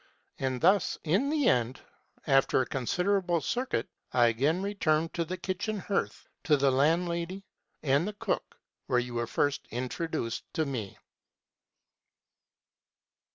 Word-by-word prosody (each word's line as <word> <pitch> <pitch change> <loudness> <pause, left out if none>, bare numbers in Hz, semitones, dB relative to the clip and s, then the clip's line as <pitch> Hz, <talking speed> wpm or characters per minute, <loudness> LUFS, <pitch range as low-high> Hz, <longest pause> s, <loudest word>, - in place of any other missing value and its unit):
And 130 -1 -1
thus 190 +3 +3
in 190 - +2
the 295 -4 +2
end, 125 - +2 0.5
though 140 - +1
after 135 -1 +4
a 130 - +2
considerable 180 - 0
circuit, 245 - -1 0.2
I 120 -1 +5
again 145 +11 +1
returned 165 -6 +1
to 170 - 0
the 185 +3 -4
kitchen 200 +4 -3
hearth, 200 0 -2 0.2
to 150 -3 +4
the 135 0 +3
landlady 170 +6 +1 0.4
and 145 +5 +2
the 210 - -3
cook, 205 - -3 0.3
where 125 - +2
you 125 0 -1
were 120 0 -1
first 145 +4 0
introduced 125 0 -3
to 160 - +1
me." 115 -9 -4
155 Hz, 135 wpm, -29 LUFS, 130-185 Hz, 0.5 s, I